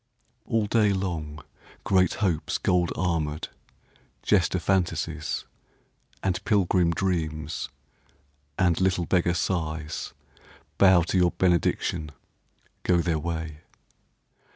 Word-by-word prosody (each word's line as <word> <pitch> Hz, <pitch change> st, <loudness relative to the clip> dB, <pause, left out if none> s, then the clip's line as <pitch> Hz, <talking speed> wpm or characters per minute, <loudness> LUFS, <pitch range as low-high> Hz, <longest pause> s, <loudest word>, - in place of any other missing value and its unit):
All 115 Hz, -2 st, +1 dB
day 105 Hz, -1 st, +3 dB
long 80 Hz, -6 st, -4 dB, 0.4 s
Great 95 Hz, -1 st, +3 dB
Hopes 85 Hz, -5 st, 0 dB
gold 90 Hz, -1 st, +1 dB
armoured, 80 Hz, -4 st, -1 dB, 0.7 s
jester 95 Hz, -2 st, +2 dB
Fantasies, 85 Hz, -4 st, -1 dB, 0.8 s
And 95 Hz, -2 st, -1 dB
pilgrim 90 Hz, -4 st, +2 dB
Dreams, 80 Hz, -4 st, -2 dB, 0.9 s
and 90 Hz, -1 st, +2 dB
little 90 Hz, -2 st, +2 dB
beggar 85 Hz, -1 st, +2 dB
Sighs, 80 Hz, -4 st, -2 dB, 0.7 s
Bow 95 Hz, -3 st, +6 dB
to 90 Hz, -, -1 dB
your 90 Hz, -1 st, +4 dB
benediction, 85 Hz, -3 st, +1 dB, 0.7 s
go 90 Hz, -, +2 dB
their 85 Hz, -2 st, 0 dB
way. 80 Hz, -1 st, -4 dB
85 Hz, 95 wpm, -26 LUFS, 80-95 Hz, 0.9 s, Bow